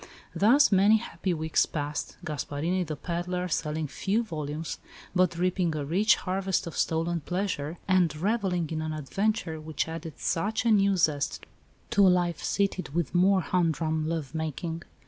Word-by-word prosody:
Thus 250 +8 +5
many 200 +3 +6
happy 190 -4 -3
weeks 160 -2 +1
passed, 145 -1 -4
Gasparini, 155 +4 -2
the 155 -2 -4
pedlar, 180 +3 -3
selling 155 -1 -1
few 200 - 0
volumes, 155 -4 -5 0.3
but 180 -2 +2
reaping 180 -2 +1
a 145 -2 -2
rich 195 +9 +4
harvest 190 0 -1
of 170 - -7
stolen 165 +1 0
pleasure, 175 -2 -2
and 180 -5 +3
revelling 185 -1 0
in 155 -1 -2
an 155 0 -3
adventure 160 +2 -1
which 155 0 -2
added 165 -1 -7
such 215 +7 -1
a 230 - +4
new 200 -2 +4
zest 145 -4 0 0.5
to 200 -4 +5
a - - +7
life 175 -2 +1
sated 195 -6 -1
with 170 -4 -1
more 185 +2 +4
humdrum 160 -3 0
love 160 -4 -3
making. 160 +1 -3
170 Hz, 155 wpm, -28 LUFS, 155-190 Hz, 0.5 s, a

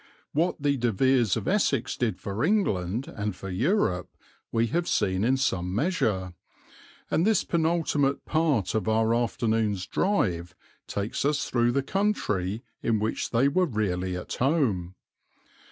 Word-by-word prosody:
What 165 +5 +1
the 140 -1 +1
De 120 -1 +1
Veres 120 -1 +2
of - - -4
Essex 160 - +1
did 120 -3 -1
for 100 +3 -3
England 125 - 0
and 105 -2 -4
for 95 +1 -7
Europe 95 - +1 0.4
we 115 0 +2
have 170 +9 -1
seen 95 +1 +1
in 130 +4 +3
some 95 -8 -1
measure, 105 - 0 0.8
and 165 - +2
this 215 0 +3
penultimate 160 -4 0
part 155 - +1
of 110 0 0
our 110 +1 +2
afternoon's 110 -4 0
drive 90 - 0 0.3
takes 100 +2 -3
us 145 +1 +1
through 120 -1 +2
the 140 +1 +1
country 115 - -1 0.2
in 115 -1 +1
which 110 +1 -2
they 125 +4 +3
were 180 +6 +2
really 95 - -1
at 90 - -6
home. 120 - 0
115 Hz, 145 wpm, -27 LUFS, 100-145 Hz, 0.8 s, in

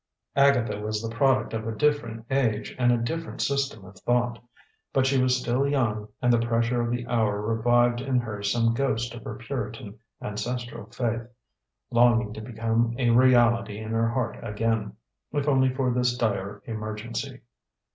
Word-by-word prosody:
Agatha 140 -6 +3
was 105 0 -2
the 115 +1 -5
product 130 -2 +2
of 110 0 -3
a 110 - -3
different 115 -5 0
age 115 -6 0
and 120 -1 +4
a 120 - +3
different 165 +8 -4
system 140 -7 -1
of 95 +1 -13
thought. 120 -1 0 0.5
But 135 -1 +3
she 135 -1 +3
was 130 0 +3
still 125 +3 +1
young, 110 -7 0 0.2
and 125 0 +4
the 120 - +4
pressure 115 +1 +1
of 120 - -1
the 120 0 -2
hour 110 -4 +1
revived 120 +2 +2
in 130 -1 0
her 110 -4 -5
some 115 +3 +2
ghost 120 -2 -1
of 120 - -9
her 105 - -6
Puritan 115 -2 -6 0.2
ancestral 115 +1 -5
faith, 115 -1 -2 0.6
longing 120 -2 +4
to 110 - -7
become 115 0 0
a 120 -3 +2
reality 120 -4 +4
in 110 0 -6
her 115 0 +2
heart 125 +2 -2
again, 110 -1 -1 0.4
if 145 0 -1
only 130 -2 +4
for 130 -1 0
this 125 0 +1
dire 100 -3 -2
emergency. 110 +1 -5
115 Hz, 165 wpm, -26 LUFS, 110-125 Hz, 0.6 s, and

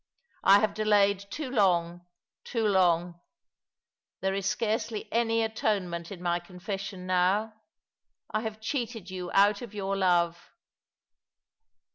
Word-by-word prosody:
I 200 +1 +7
have 215 -2 +1
delayed 205 -2 +3
too 290 0 -5
long— 175 -6 +1 0.4
too 230 -2 -2
long! 175 -3 +2 1.0
There 190 0 0
is 195 0 -2
scarcely 220 0 -2
any 230 -1 +2
atonement 195 -6 -2
in 180 -2 -8
my 175 0 +1
confession 185 +1 -6
now. 185 +4 +1 0.8
I 215 - 0
have 220 -1 -5
cheated 225 -5 -4
you 180 -1 -5
out 200 +1 +4
of 225 -4 -9
your 195 -1 -2
love." 175 -3 +2
195 Hz, 120 wpm, -28 LUFS, 180-215 Hz, 1.0 s, I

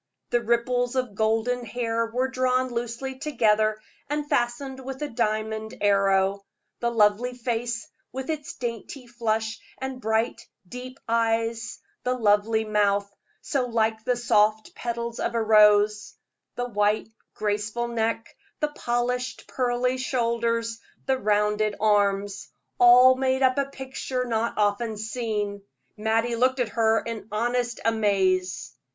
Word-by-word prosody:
The 240 -1 +2
ripples 245 +2 0
of 250 -5 -1
golden 225 +4 0
hair 230 0 -1
were 250 +3 0
drawn 255 0 +1
loosely 240 +2 -4
together, 215 -7 +2 0.3
and 295 0 -2
fastened 260 +2 -1
with 265 0 -6
a - - -1
diamond 220 -1 -2
arrow; 195 -1 +2 0.4
the 235 - 0
lovely 230 +2 +2
face, 235 -1 -3 0.2
with 265 0 -5
its 305 0 -5
dainty 240 +2 -5
flush 225 -2 -2 0.2
and 265 -1 -5
bright, 220 +1 0 0.3
deep 255 +4 -8
eyes; 230 0 0 0.3
the 250 0 0
lovely 220 -1 +2
mouth, 200 -1 +1 0.3
so 270 -5 -1
like 220 -1 0
the 250 - +1
soft 215 -2 +2
petals 235 -1 -4
of - - -2
a 230 - +1
rose; 210 -1 +4 0.4
the 245 0 -2
white, 210 -1 +1 0.3
graceful 210 +3 -1
neck, 225 -1 -2 0.2
the 300 - 0
polished, 245 -3 -2
pearly 250 0 0
shoulders, 230 -3 -1 0.3
the 265 -1 +1
rounded 210 0 +1
arms 205 -1 +1 0.3
all 245 +1 +8
made 260 0 0
up 260 +1 +3
a 280 - +2
picture 265 -1 -4
not 230 -1 -1
often 215 +2 0
seen. 210 -2 -3 0.3
Mattie 225 +2 0
looked 260 +2 +2
at 245 -3 0
her 225 -1 +2
in 230 -2 -6
honest 240 +2 -1
amaze. 185 - +1
230 Hz, 130 wpm, -25 LUFS, 215-250 Hz, 0.4 s, all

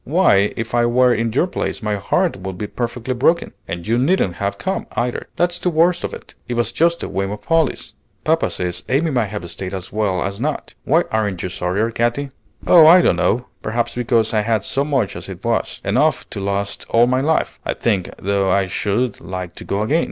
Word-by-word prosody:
Why, 125 - +3
if 115 0 -4
I 120 0 +3
were 125 +1 +4
in 115 0 0
your 135 +9 +2
place 180 - -4
my 105 -1 0
heart 170 - 0
would 95 -1 -6
be 105 - -3
perfectly 120 +3 -3
broken. 155 +7 +1
And 85 0 -5
you 115 +2 +1
needn't 130 - +1
have 100 0 -2
come, 190 - -3
either; 120 +1 -2
that's 175 0 +1
the 180 - 0
worst 170 +2 +2
of - - -2
it. - - -10
It 120 - -3
was 120 0 0
just 170 +1 +1
a - - -2
whim 95 +1 -2
of 105 +1 -6
Polly's. 165 -1 0 0.3
Papa - - +2
says 90 -1 -4
Amy 150 +5 +2
might 120 -5 +1
have 100 -3 -6
stayed 95 0 -5
as 95 -1 -7
well 105 -4 0
as 100 +3 -4
not. 150 +2 -3
Why 165 +5 +3
aren't 105 -5 -1
you 90 - -2
sorrier, 95 +6 -1
Katy?" 120 +5 -1 0.3
"Oh, 165 -3 +8
I 175 +2 +8
don't - - +3
know. 125 +3 +1 0.2
Perhaps 120 +2 -1
because 115 -2 +1
I 110 - +3
had 110 -2 0
so 140 - 0
much 135 -8 0
as - - -8
it - - -9
was, - - -1
enough - - +2
to - - -5
last 100 0 -2
all 115 +1 +5
my 130 +1 +1
life, 155 +3 0
I - - -2
think, 100 -6 0
though 100 0 0
I 95 +1 +3
should 105 +6 -1
like 90 -1 -6
to - - -10
go 100 +2 -1
again. 150 +9 +2
115 Hz, 220 wpm, -20 LUFS, 100-140 Hz, 0.3 s, Oh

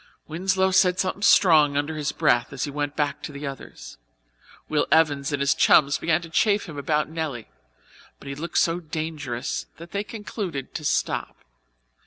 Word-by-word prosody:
Winslow 190 +3 +1
said 180 -1 +4
something 190 +1 -1
strong 155 -8 +5
under 145 +2 -1
his 150 -1 -2
breath 120 -7 +1
as 135 -1 -4
he 145 - -3
went 145 0 -3
back 145 -1 -1
to - - -6
the 140 +1 -7
others. 135 - -9 0.7
Will 150 -1 0
Evans 150 -3 +3
and 145 - -1
his 140 +3 +3
chums 145 -2 +4
began 165 +1 +1
to 165 - -9
chaff 205 +4 +2
him 155 - -9
about 150 +2 0
Nelly, 155 -7 -5 0.7
but - - -14
he 140 - -4
looked 160 +5 -4
so 170 +1 +2
dangerous 150 -6 -4
that 170 +2 -12
they 200 0 -2
concluded 205 - -6
to 155 - -5
stop. - - -2
155 Hz, 175 wpm, -24 LUFS, 140-170 Hz, 0.7 s, strong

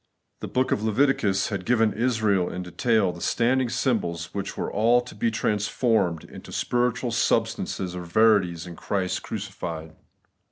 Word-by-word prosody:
The - - -5
book 130 +1 0
of - - +1
Leviticus 110 -4 +2
had 100 -3 -3
given 115 -1 +2
Israel 110 -6 +1
in 90 - -4
detail 100 +2 +1
the 85 - -11
standing 125 +1 +1
symbols 85 -11 -1
which 100 -1 -4
were - - -3
all 115 +4 +4
to 125 - -11
be 115 - 0
trans 105 -2 0
formed 105 -9 +1
into - - -11
spiritual 125 0 0
substances 90 -4 0
or 90 - -4
verities 90 -2 +2
in 85 -1 -8
Christ 95 +1 -2
crucified. 85 -6 -6
105 Hz, 155 wpm, -25 LUFS, 90-115 Hz, -, all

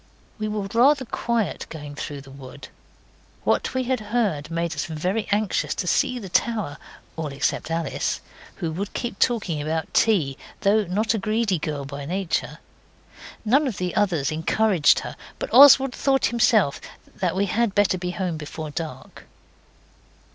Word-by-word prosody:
We 215 - -2
were 210 -1 -2
rather 265 +3 +4
quiet 230 -4 -2
going 150 -2 -8
through 145 -1 -6
the 135 0 -14
wood. 135 +1 -11 0.7
What - - 0
we 260 - +1
had 255 0 0
heard 210 -9 -1
made 170 0 -2
us 145 - -3
very 180 +7 -2
anxious 205 -1 0
to - - -3
see 255 +7 +1
the 210 -5 -7
tower 195 -5 0 0.4
all 160 -2 -3
except 140 +2 -2
Alice, 165 -2 -1 0.4
who 165 - -3
would 195 +5 -4
keep 235 -5 -4
talking 200 -11 +1
about 160 +2 -3
tea, 160 -12 +2 0.2
though 205 +1 +3
not 210 +6 0
a 220 - -1
greedy 215 -3 0
girl 145 -2 -3
by 140 +1 -7
nature. 185 +2 -2 0.9
None 275 +7 +3
of 235 - -3
the 180 -1 -2
others 170 -9 +1
encouraged 165 +1 +3
her, - - -7 0.2
but - - -5
Oswald 270 -2 +8
thought 270 -2 +2
himself 220 - +3 0.4
that 180 -2 -1
we 195 +1 +2
had 215 +1 0
better 200 -3 +3
be 180 0 -3
home 180 -2 -2
before 155 0 -6
dark. 155 -4 -7
190 Hz, 160 wpm, -24 LUFS, 155-220 Hz, 0.9 s, Oswald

